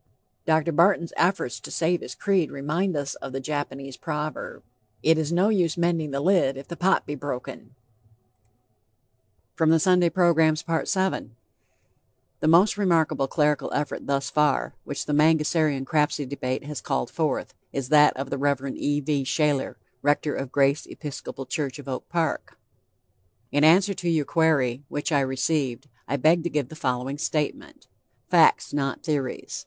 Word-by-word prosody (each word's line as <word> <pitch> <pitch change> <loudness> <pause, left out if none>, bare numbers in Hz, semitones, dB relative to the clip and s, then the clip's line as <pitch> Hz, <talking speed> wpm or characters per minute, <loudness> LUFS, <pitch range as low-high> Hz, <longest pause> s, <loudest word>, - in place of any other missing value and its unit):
Dr. 160 0 +2
Barton's 170 +1 +3
efforts 175 -8 0
to - - -10
save 175 +1 0
his - - -8
creed 195 -5 +1
remind 155 +6 -2
us 140 -1 -3
of 135 - -8
the 135 - -2
Japanese 135 -2 -5
proverb: 150 +1 -5 0.4
"It 160 0 +4
is 155 0 -2
no 180 +5 +3
use 180 -7 +1
mending 170 -3 0
the 140 0 -2
lid, 160 -5 +2
if 135 - -9
the 170 - -6
pot 190 +3 +2
be 145 - -4
broken." 130 -3 -7 1.8
VII 160 0 +5
The 170 - -1
most 180 +7 +5
remarkable 165 -7 +2
clerical 150 0 0
effort 145 0 -3
thus 140 0 -1
far, 150 -2 +1
which 140 - -4
The 150 - -2
Mangasarian 150 -2 +2
Crapsey 150 -1 0
Debate 130 -1 -3
has 145 -5 -6
called 65 - -2
forth, - - -2 0.2
is 135 -2 -4
that 150 -2 +5
of 135 0 -5
the 140 - -2
Rev. 140 -1 -1
E. 145 0 -1
V. 140 -1 0
Shayler, 145 0 0 0.3
rector 145 +1 +1
of 135 -2 -5
Grace 140 +1 +2
Episcopal 145 -2 -7
Church 140 -4 -3
of 145 - -11
Oak 130 -1 -5
Park. 170 -2 -2 0.9
"In 145 +1 +2
answer 185 +6 +5
to 175 -2 -3
your 160 -3 +1
query, 145 -6 +1
which 145 +3 -3
I 145 - +3
received, 135 0 -1 0.2
I 140 - -1
beg 160 +5 +4
to - - 0
give 145 -5 -2
the - - -10
following 130 -1 -2
statement. 150 -1 -3 0.5
Facts, - - +4
not 140 -2 -2
theories. 145 -5 -3
150 Hz, 150 wpm, -25 LUFS, 140-165 Hz, 1.8 s, VII